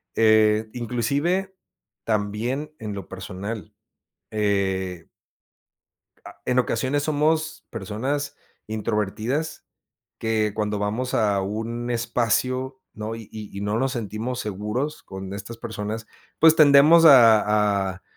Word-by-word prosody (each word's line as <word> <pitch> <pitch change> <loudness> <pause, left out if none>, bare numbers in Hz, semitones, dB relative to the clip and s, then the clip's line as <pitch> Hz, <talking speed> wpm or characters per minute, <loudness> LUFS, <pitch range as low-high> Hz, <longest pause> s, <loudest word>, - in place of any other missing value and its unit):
eh, 110 0 +4
inclusive 140 - -1 0.5
también 110 +7 -2
en 105 -2 -5
lo 100 -3 -7
personal. 100 +3 -7 0.6
Eh. 95 -4 -1 1.2
Ah, - - -12
en 125 0 +2
ocasiones 130 +4 0
somos 155 +1 0
personas 140 +7 -3 0.3
introvertidas, 110 +7 -2 0.5
que 110 -2 0
cuando 105 -1 -1
vamos 110 +5 -2
a 105 -3 +2
un 115 +5 -4
espacio, 125 +3 0
¿no?, 110 +1 -5
y 115 -2 -9
y 105 -2 -8
y - - -4
no 105 +2 0
nos 130 +1 0
sentimos 115 +1 -4
seguros 105 +8 -3
con 95 0 -8
estas 100 +4 -7
personas, 110 -1 -5 0.3
pues, 160 0 +6
tendemos 155 +2 +7
a 105 -7 +6
a 95 - -14
110 Hz, 110 wpm, -24 LUFS, 105-130 Hz, 1.2 s, tendemos